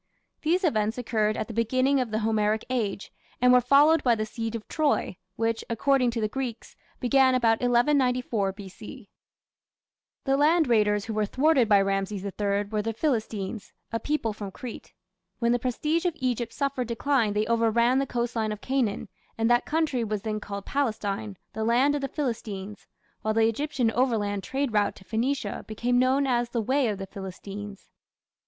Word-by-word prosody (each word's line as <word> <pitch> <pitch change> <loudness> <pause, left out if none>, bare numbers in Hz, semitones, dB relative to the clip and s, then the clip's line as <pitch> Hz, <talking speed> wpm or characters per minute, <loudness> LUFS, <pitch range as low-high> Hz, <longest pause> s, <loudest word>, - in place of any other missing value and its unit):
These 350 +5 +1
events 220 - +1
occurred 220 -3 0
at - - -3
the 230 - -7
beginning 255 +5 +2
of 250 -3 -1
the 215 - -1
Homeric 215 0 +1
Age, 210 -6 -2 0.3
and 250 0 +5
were 250 - +6
followed 290 +6 +5
by 240 -2 +4
the 215 -1 -2
siege 225 +1 -4
of 220 - -7
Troy, 295 - 0 0.2
which, 225 0 -1
according 255 +2 +2
to 235 0 -3
the 215 - +1
Greeks, 240 0 -5 0.2
began 260 +1 +4
about 230 -3 +2
1194 245 -4 +2
B.C. 205 +4 -11 1.1
The 270 0 +2
land 315 +3 +4
raiders 210 -3 +2
who 225 - -4
were 215 -1 0
thwarted 265 -1 +3
by 205 -1 +6
Rameses 195 0 -1
III 200 0 -1
were 210 +1 -2
the 225 +1 -3
Philistines, 220 -7 -2 0.2
a 230 - -1
people 235 -4 -1
from 205 -1 -6
Crete. 235 +5 -9 0.5
When 235 0 +1
the 245 - +2
prestige 300 +8 -1
of 345 - -2
Egypt 245 -3 -1
suffered 275 -4 -2
decline 235 -2 +1
they 210 +1 +1
overran 235 +2 +2
the 275 - -1
coastline 235 -3 -1
of 210 - -5
Canaan, 255 -5 -1 0.3
and 225 +1 +2
that 240 +1 +3
country 305 -6 0
was 210 -2 -3
then 215 -1 -2
called 200 -1 -7
Palestine, 215 -6 -2 0.2
"the 220 - -3
land 245 +6 +3
of 290 - -1
the 275 - -1
Philistines", 215 -8 -5 0.3
while 215 0 -1
the 225 0 +4
Egyptian 255 0 0
overland 220 -5 0
trade 270 +4 -2
route 210 -1 +2
to - - -15
Phoenicia 230 0 -2
became 245 +3 0
known 260 +2 +3
as 240 -2 +1
"the 240 - -2
way 260 +4 +1
of 210 -2 -2
the 195 - -5
Philistines". 200 +1 -8
230 Hz, 175 wpm, -26 LUFS, 210-260 Hz, 1.1 s, were